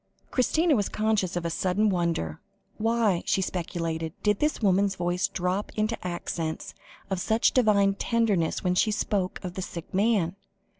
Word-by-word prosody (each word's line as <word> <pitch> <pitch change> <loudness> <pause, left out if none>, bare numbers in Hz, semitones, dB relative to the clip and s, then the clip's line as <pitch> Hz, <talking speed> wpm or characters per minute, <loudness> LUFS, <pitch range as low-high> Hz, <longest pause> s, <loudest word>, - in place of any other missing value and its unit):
Christina 310 +5 +3
was 205 -4 0
conscious 215 -5 0
of 175 -1 -2
a 170 - -1
sudden 190 +5 +1
wonder. 170 - -1 0.4
Why, 220 -5 +2
she - - +2
speculated, 165 -3 -3
did 210 -1 +2
this 300 +1 +1
woman's 195 -1 +2
voice 180 +1 0
drop 190 +1 -2
into 215 +1 0
accents 170 -2 -4 0.4
of 190 -2 -1
such 220 +4 +3
divine 205 -5 +4
tenderness 205 -6 0
when 180 -1 +2
she 200 +4 +3
spoke 205 -3 -1
of 180 -2 -5
the 190 - -4
sick 170 -2 -7
man? 195 -3 +2
190 Hz, 155 wpm, -27 LUFS, 175-215 Hz, 0.4 s, divine